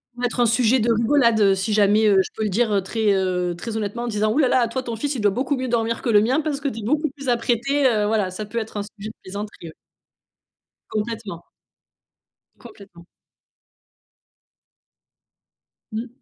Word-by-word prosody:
ça 245 - -9
peut - - +1
être 245 0 -3
un 240 - +5
sujet 235 +2 +3
de 235 +1 +2
rigolade, 235 0 +3
heu, 195 -1 +5
si 195 +3 -2
jamais, 210 +1 +4
heu, 195 -2 +5
je - - -5
peux 220 - -3
le 215 - 0
dire 210 0 +1
très, 215 +2 0
heu, 180 -2 0
très 220 +5 -6
honnêtement 220 +2 -3
en - - -3
disant: 215 -1 0
«Ouh - - -2
là 295 -4 +4
là, 245 -1 +3
toi 260 +3 -4
ton 235 -2 -4
fils 280 +6 -2
il 235 - -3
doit 205 - +3
beaucoup 260 +6 -1
mieux 260 0 -3
dormir 230 -1 -1
que 245 - -2
le 210 -2 +5
mien 255 +7 +2
parce 295 -2 -2
que 285 - -3
tu 230 - -7
es - - -7
beaucoup 300 +7 0
plus 275 -1 -7
apprêtée», 245 +4 +1
heu, 215 -4 +1
voilà, 210 -3 0
ça 210 +3 -6
peut 230 +3 -3
être 220 -1 -6
un 205 - -2
sujet 210 +1 -9
de 220 - -12
plaisanterie, 205 +2 -7
oui. 160 - -10 1.2
Complètement. 215 -5 -4 1.1
Complètement. 185 -5 -15 2.9
Mmh. 225 +3 -4
225 Hz, 205 wpm, -22 LUFS, 205-245 Hz, 2.9 s, un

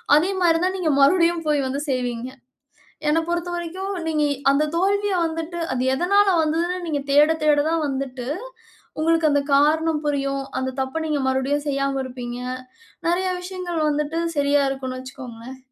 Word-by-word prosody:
அதே 345 +6 +3
மாரி 330 -1 +4
தான் 375 +1 0
நீங்க 330 - 0
மறுபடியும் 335 +2 +4
போய் 285 -2 +2
வந்து 275 +2 -2
செய்வீங்க. 245 -1 -2 0.8
என்ன 315 +2 +3
பொறுத்தவரைக்கும், 345 +2 -3 0.2
நீங்க, 305 -2 +1 0.3
அந்த 280 +2 +2
தோல்விய 400 +2 +1
வந்துட்டு, 330 +1 -4 0.2
அது 255 0 -1
எதனால 400 +6 +3
வந்ததுனு, 335 +3 0
நீங்க 290 -3 -1
தேட, 295 +2 +6
தேட 300 -1 +4
தான் 325 -1 0
வந்துட்டு, 265 -2 -4 0.7
உங்களுக்கு 325 -1 +3
அந்த 285 0 +3
காரணம் 310 +2 +3
புரியும். 275 -1 -1 0.2
அந்த 260 0 -1
தப்ப 265 +5 -3
நீங்க 295 -2 0
மறுபடியும் 265 +3 0
செய்யாம 275 -1 0
இருப்பீங்க. 245 -1 -6 0.7
நெறைய 360 +2 +1
விஷயங்கள் 360 -2 -4
வந்துட்டு, 300 +2 -1 0.2
சரியா 285 0 +3
இருக்குன்னு 260 -1 -4
வச்சிக்கோங்களேன். 255 -1 -9
300 Hz, 145 wpm, -22 LUFS, 270-335 Hz, 0.8 s, தேட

